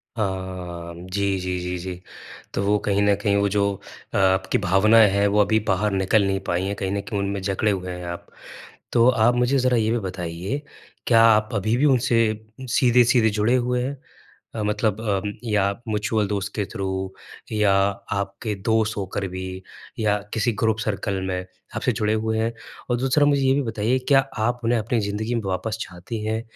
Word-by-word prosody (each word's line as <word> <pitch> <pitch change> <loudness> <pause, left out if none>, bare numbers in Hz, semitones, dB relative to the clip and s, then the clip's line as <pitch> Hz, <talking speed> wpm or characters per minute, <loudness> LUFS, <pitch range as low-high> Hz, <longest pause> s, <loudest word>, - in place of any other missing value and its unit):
हाँ 95 -4 -4
म, 85 +2 -10
जी, 100 +1 0
जी, 90 0 -2
जी, 90 0 -3
जी। 90 0 -6 0.5
तो 100 - -1
वो 105 +1 +3
कहीं 100 -1 +2
न 100 0 +4
कहीं 100 -1 +2
वो 100 0 +2
जो 100 +1 +1 0.5
अ, - - +1
आपकी 95 0 +2
भावनाएँ 105 +4 +5
हैं, 100 +1 +2
वो 105 +1 +2
अभी 110 +2 +3
बाहर 105 +3 +1
निकल 95 +2 +2
नहीं 95 0 0
पाई 90 +1 0
हैं, 100 +1 -2
कहीं 95 -1 -3
न 100 0 -1
कहीं 105 -1 -4
उनमें 100 0 -2
जकड़े 100 +2 0
हुए 90 -2 -3
हैं 90 0 -6
आप। 85 0 -6 0.7
तो 120 0 +5
आप 120 -1 +3
मुझे 125 +3 +2
ज़रा 125 -1 +2
ये 110 -1 +1
भी 120 - +1
बताइए, 90 - -4 0.5
क्या 115 -2 +6
आप 110 -1 +5
अभी 110 +3 +1
भी 140 - +3
उनसे 130 -4 +3 0.5
सीधे-सीधे 120 -1 +4
जुड़े 105 +4 +1
हुए 125 0 0
हैं 140 +2 -4 0.6
अ, 110 - -3
मतलब 105 0 0
अम, 105 -2 -1
या 105 -3 +2 0.2
म्यूचुअल 105 0 0
दोस्त 100 0 -3
के 105 - -1
थ्रू 95 -1 -3 0.4
या 105 -2 +3
आपके 100 +1 -1
दोष 110 +2 0
होकर 100 0 -3
भी 95 +1 -5 0.5
या 105 -2 +2 0.2
किसी 115 +2 +1
ग्रुप 110 -1 +2
सर्कल 100 -2 -2
में, 90 -1 -2 0.3
आपसे - - +1
जुड़े 105 0 0
हुए 110 0 -1
हैं? 115 +1 0 0.4
और 120 - +3
दूसरा 135 +3 +3
मुझे 145 -1 +3
ये 130 0 +4
भी 140 - +1
बताइए, 115 +1 0
क्या 140 -2 +6 0.2
आप 120 +3 0
उन्हें 115 +1 +2
अपनी 115 +2 0
ज़िंदगी 105 +3 -2
में 115 - -1
वापस 100 +4 -2
चाहती 105 +4 -6
हैं 110 +1 -1
105 Hz, 190 wpm, -23 LUFS, 95-115 Hz, 0.7 s, क्या